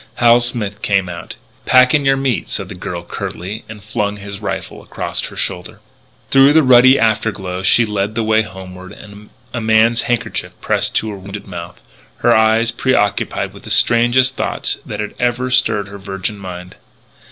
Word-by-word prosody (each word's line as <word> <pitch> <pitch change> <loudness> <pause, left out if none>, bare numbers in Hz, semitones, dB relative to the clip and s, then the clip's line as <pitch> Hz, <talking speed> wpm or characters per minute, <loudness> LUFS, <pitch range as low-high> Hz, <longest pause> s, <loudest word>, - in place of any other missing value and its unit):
Hal 120 0 +5
Smith 115 -4 -2
came 100 -2 +1
out. 85 -1 -8 0.3
"Pack 125 0 +5
in 145 -2 +2
your 135 0 +3
meat," 135 -4 -1
said - - -3
the - - -7
girl 90 -1 -6
curtly, 95 +4 -6
and 105 -2 -10
flung 105 -1 -2
his 100 0 -8
rifle 105 - -5
across - - -4
her - - -10
shoulder. - - -3 0.5
Through 135 +1 +6
the 160 0 +5
ruddy 130 +1 +6
afterglow 105 -4 -1
she 115 +4 +4
led 105 0 -2
the 115 - 0
way 110 0 +3
homeward, 95 -2 -10 0.6
a 120 - -3
man's 110 +1 +3
handkerchief 120 -4 -3
pressed - - 0
to 110 - 0
her 100 - -7
wounded 100 +2 -8
mouth, 85 -2 -8 0.4
her - - +3
eyes 110 +1 +3
preoccupied 110 -4 0
with - - -13
the - - -10
strangest 120 +2 +3
thoughts - - -2
that - - -4 0.2
ever 125 0 0
had 130 0 -2
stirred 110 -5 +2
her 100 0 -10
virgin 95 +2 -5
mind. 90 -1 -9
110 Hz, 175 wpm, -17 LUFS, 100-120 Hz, 0.6 s, Through